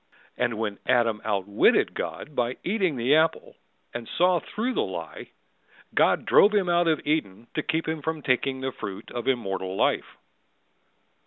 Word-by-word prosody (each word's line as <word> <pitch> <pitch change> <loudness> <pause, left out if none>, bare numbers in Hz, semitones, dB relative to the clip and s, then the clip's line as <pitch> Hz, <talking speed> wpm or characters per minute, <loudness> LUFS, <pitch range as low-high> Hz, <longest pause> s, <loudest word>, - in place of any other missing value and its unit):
And 115 -3 -1
when 105 -2 -3
Adam 115 -3 +2
outwitted 100 -1 +2
God 150 - -6
by 120 0 -1
eating 185 -5 0
the 125 +3 +2
apple 160 +1 +1 0.4
And 120 -1 -6
saw 180 0 +4
through 235 +9 -3
the - - +1
lie, - - -6 0.6
God - - +3
drove 210 +1 +5
him 195 -3 +2
out 175 0 +3
of 160 -2 +1
Eden 120 -9 -1
to 155 - -1
keep 160 0 -2
him 160 -1 -2
from 160 0 -3
taking 130 +1 0
The 130 0 -2
fruit 100 -6 -8
of 120 -1 -5
immortal 95 -7 -1
life. - - 0
135 Hz, 160 wpm, -26 LUFS, 115-165 Hz, 0.6 s, drove